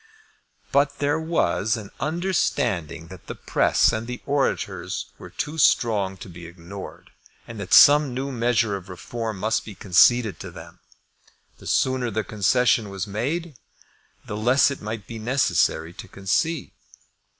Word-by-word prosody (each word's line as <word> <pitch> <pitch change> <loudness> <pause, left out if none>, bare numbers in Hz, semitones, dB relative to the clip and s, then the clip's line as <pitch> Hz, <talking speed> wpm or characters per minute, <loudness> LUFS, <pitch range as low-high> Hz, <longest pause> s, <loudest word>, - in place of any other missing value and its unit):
But 140 0 +2
there 145 +2 0
was 120 - 0
an 105 -3 -9
understanding 140 - -1
that 95 -2 -13
the - - -6
press - - +2
and 110 +1 -3
the 125 0 -5
orators 140 -1 -2
were - - -10
too 155 +2 -4
strong 100 -8 +2
to - - -10
be 85 -1 -10
ignored, 90 +3 -10 0.4
and 115 -2 -8
that 95 -2 -7
some 145 -1 +7
new 135 +3 -3
measure 115 -3 +1
of 95 0 -9
Reform 110 +4 -5
must 110 +4 0
be 105 - -10
conceded 105 +4 +4
to - - -7
them. - - -12 0.8
The - - -11
sooner 130 -2 +1
the 110 0 -2
concession 110 +1 +2
was 95 -2 -4
made, 140 - -3 0.7
the 105 - -5
less 125 +6 +3
it 140 - -6
might 105 -1 -5
be 115 -1 -8
necessary 110 - +1
to 110 +3 -10
concede. 115 - -1
115 Hz, 150 wpm, -24 LUFS, 100-135 Hz, 0.8 s, some